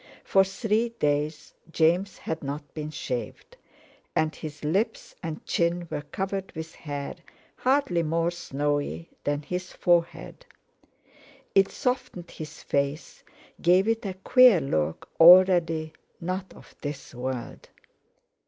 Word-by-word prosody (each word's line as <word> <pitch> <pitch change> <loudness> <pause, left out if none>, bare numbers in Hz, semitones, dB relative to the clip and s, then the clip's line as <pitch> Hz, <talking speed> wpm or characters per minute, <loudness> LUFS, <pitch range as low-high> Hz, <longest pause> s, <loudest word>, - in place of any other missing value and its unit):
For 195 - +4
three 215 +4 0
days 150 -7 -1 0.2
James 175 +5 +2
had 160 0 -4
not 145 +1 -6
been 155 -1 -5
shaved, 155 - -5 0.6
and 155 0 +1
his 150 -1 -8
lips 195 +9 -1
and 160 -3 -6
chin 170 0 0
were - - -2
covered 195 +5 -4
with 160 0 -7
hair, 145 -2 -5 0.4
hardly 255 -10 +2
more 165 +1 0
snowy 145 - -2 0.2
than 145 +1 -1
his 180 +4 -4
forehead. 175 - 0 1.1
It 195 0 +5
softened 250 - -3
his 155 -1 -9
face, 140 +3 -2 0.4
gave 185 +4 +4
it 225 0 +1
a 195 -3 -4
queer 245 +1 +6
look 80 - -2
already 165 -2 +7 0.3
not 185 +2 -4
of - - -16
this 145 -1 -6
world. 125 -1 -5
165 Hz, 120 wpm, -26 LUFS, 150-190 Hz, 1.1 s, already